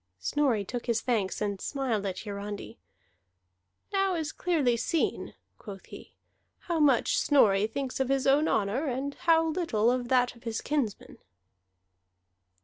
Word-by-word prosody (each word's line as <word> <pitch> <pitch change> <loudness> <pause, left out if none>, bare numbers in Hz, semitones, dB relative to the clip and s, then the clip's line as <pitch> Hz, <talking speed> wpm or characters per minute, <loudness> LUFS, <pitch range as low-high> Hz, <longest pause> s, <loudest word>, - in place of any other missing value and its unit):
Snorri 235 - 0
took 245 +4 -5
his 230 -2 +1
thanks, 215 -7 -1
and 200 -2 -2
smiled 245 -8 -2
at 185 - -4
Hiarandi. 205 - -7 1.1
"Now 390 -1 +2
is 315 -2 -2
clearly 300 -9 +1
seen," 275 +7 -1 0.2
quoth 195 -3 -10
he, - - -13 0.5
"how 340 -2 -2
much 280 -5 +3
Snorri 210 -8 +4
thinks 265 +3 -4
of 265 -1 0
his 270 -1 +1
own 285 +3 +4
honor, 220 +9 0
and 270 +2 -2
how 325 +1 +2
little 245 -10 +1
of 250 -1 -1
that 250 -1 +2
of 235 - -18
his 230 -2 -3
kinsmen." 275 -9 -3
250 Hz, 140 wpm, -28 LUFS, 215-295 Hz, 1.1 s, Snorri